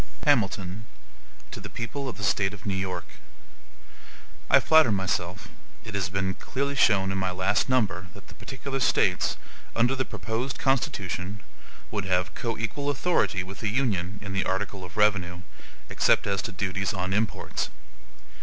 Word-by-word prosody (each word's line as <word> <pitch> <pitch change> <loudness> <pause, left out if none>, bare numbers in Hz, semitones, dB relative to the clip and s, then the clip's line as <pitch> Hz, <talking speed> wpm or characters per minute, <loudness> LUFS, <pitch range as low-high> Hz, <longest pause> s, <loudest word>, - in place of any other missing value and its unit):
HAMILTON 105 -6 +1 0.6
To - - -6
the - - -8
People 135 +4 -4
of 115 - -7
the 100 - -7
State 100 +1 +2
of 95 - -14
New 100 - 0
York: 95 -2 -2 1.4
I - - +8
FLATTER 160 -7 +6
myself 95 -1 -1 0.4
it 110 - -7
has 95 -2 0
been 95 -1 0
clearly 140 +7 -2
shown 95 -7 +4
in 95 - -1
my 95 -1 +1
last 95 +5 +1
number 100 -8 +1
that - - -13
the - - -12
particular 135 +1 -5
States, 125 - +2 0.4
under 120 +3 +3
the 130 - 0
proposed 120 +2 -3
Constitution, 100 -7 -1 0.5
would 100 - -2
have 90 -1 +1
COEQUAL 115 +5 -2
authority 140 - +1
with 95 +1 -9
the 110 - -1
Union 105 -6 0
in 100 -2 -5
the 95 - +1
article 95 0 -2
of 90 +3 -10
revenue, 90 -4 +2 0.5
except - - +3
as 100 -2 0
to 110 - -4
duties 95 +1 -1
on 95 0 -1
imports. 105 +2 -1
100 Hz, 155 wpm, -27 LUFS, 95-115 Hz, 1.4 s, I